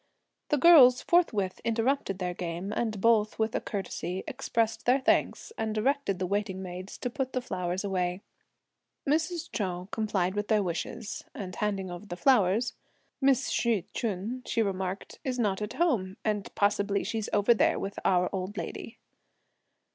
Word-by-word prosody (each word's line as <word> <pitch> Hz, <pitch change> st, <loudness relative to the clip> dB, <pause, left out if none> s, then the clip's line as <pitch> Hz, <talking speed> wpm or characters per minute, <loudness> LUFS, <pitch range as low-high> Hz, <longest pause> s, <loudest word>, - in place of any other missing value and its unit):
The 295 Hz, -, +3 dB
girls 270 Hz, -6 st, +8 dB
forthwith 215 Hz, -, +2 dB
interrupted 230 Hz, -2 st, 0 dB
their 180 Hz, -2 st, -2 dB
game, 175 Hz, +3 st, -4 dB
and 220 Hz, -3 st, -1 dB
both 215 Hz, 0 st, +3 dB
with 220 Hz, 0 st, 0 dB
a -, -, -1 dB
curtsey, 190 Hz, -2 st, -4 dB
expressed 225 Hz, 0 st, -1 dB
their 255 Hz, +2 st, +5 dB
thanks, 275 Hz, -, +1 dB
and 220 Hz, -1 st, -1 dB
directed 260 Hz, -3 st, +1 dB
the 185 Hz, -, -1 dB
waiting 195 Hz, 0 st, -2 dB
maids 185 Hz, +2 st, -7 dB
to 250 Hz, -, -3 dB
put 265 Hz, 0 st, -3 dB
the 255 Hz, -, +1 dB
flowers 180 Hz, -6 st, -3 dB
away. 185 Hz, -1 st, -1 dB, 0.8 s
Mrs. 325 Hz, +3 st, 0 dB
Chou 185 Hz, -2 st, -3 dB
complied 200 Hz, -4 st, 0 dB
with 205 Hz, 0 st, -2 dB
their 215 Hz, -2 st, +3 dB
wishes 180 Hz, +4 st, -4 dB
(and 185 Hz, -2 st, -6 dB
handing 195 Hz, -3 st, -1 dB
over 175 Hz, +4 st, -8 dB
the 175 Hz, -, -6 dB
flowers); 230 Hz, -1 st, +3 dB, 0.5 s
"Miss 270 Hz, -2 st, +3 dB
Hsi 225 Hz, -7 st, +1 dB
Ch'un," 225 Hz, +3 st, -3 dB
she 230 Hz, -, +1 dB
remarked, 190 Hz, -1 st, -4 dB
"is 255 Hz, -2 st, -2 dB
not 210 Hz, -4 st, 0 dB
at 210 Hz, +1 st, -3 dB
home; 220 Hz, -, 0 dB
and 210 Hz, -2 st, -1 dB
possibly 200 Hz, 0 st, +1 dB
she's 220 Hz, -2 st, -3 dB
over 205 Hz, +3 st, +4 dB
there 230 Hz, -, +2 dB
with 195 Hz, -, -4 dB
our 180 Hz, -1 st, +3 dB
old 190 Hz, +2 st, -4 dB
lady." -, -, -6 dB
205 Hz, 160 wpm, -29 LUFS, 185-235 Hz, 0.8 s, girls